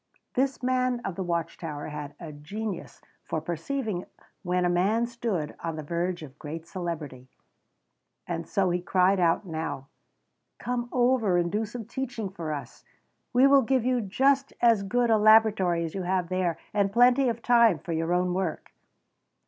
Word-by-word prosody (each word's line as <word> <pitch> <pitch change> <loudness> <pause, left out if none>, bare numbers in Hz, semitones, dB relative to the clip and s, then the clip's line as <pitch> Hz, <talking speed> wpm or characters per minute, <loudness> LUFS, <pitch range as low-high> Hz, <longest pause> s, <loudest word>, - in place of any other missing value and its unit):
This 265 0 0
man 255 -1 +1
of 195 - -2
the 190 - -5
watch 170 -2 -2
tower 150 -3 -5
had 150 -1 -7
a 165 -3 -7
genius 185 +6 -6 0.2
for - - -2
perceiving 180 - -3 0.4
when 180 -1 0
a - - +3
man 195 +7 +2
stood 230 -10 -3
on 165 -1 -4
the 155 - -5
verge 170 +2 -2
of 140 -1 -12
great 160 +2 -7
celebrity, 155 -8 -6 1.0
and 165 -1 -4
so 190 -3 +1
he 175 0 0
cried 185 +2 +2
out 170 +3 +2
now: 160 -5 -5 0.7
"Come 240 -1 -3
over 240 -7 +2
and 170 -1 0
do 215 +2 0
some 225 +1 -7
teaching 235 -3 -4
for 170 -4 -5
us! 145 -2 -7 0.5
We 255 +2 +5
will 275 0 +6
give 260 0 +1
you 250 -1 +2
just 270 +7 +1
as 230 -4 +4
good 235 +4 +1
a 220 - +4
laboratory 210 -6 +4
as 160 - -6
you 195 - -3
have 180 -1 -1
there 185 -2 0 0.2
and 200 -1 +1
plenty 245 +3 +5
of 235 0 -4
time 235 -6 +5
for 170 +3 -7
your 165 +1 -1
own 180 0 +1
work." 185 -3 -3
185 Hz, 175 wpm, -27 LUFS, 170-235 Hz, 1.0 s, will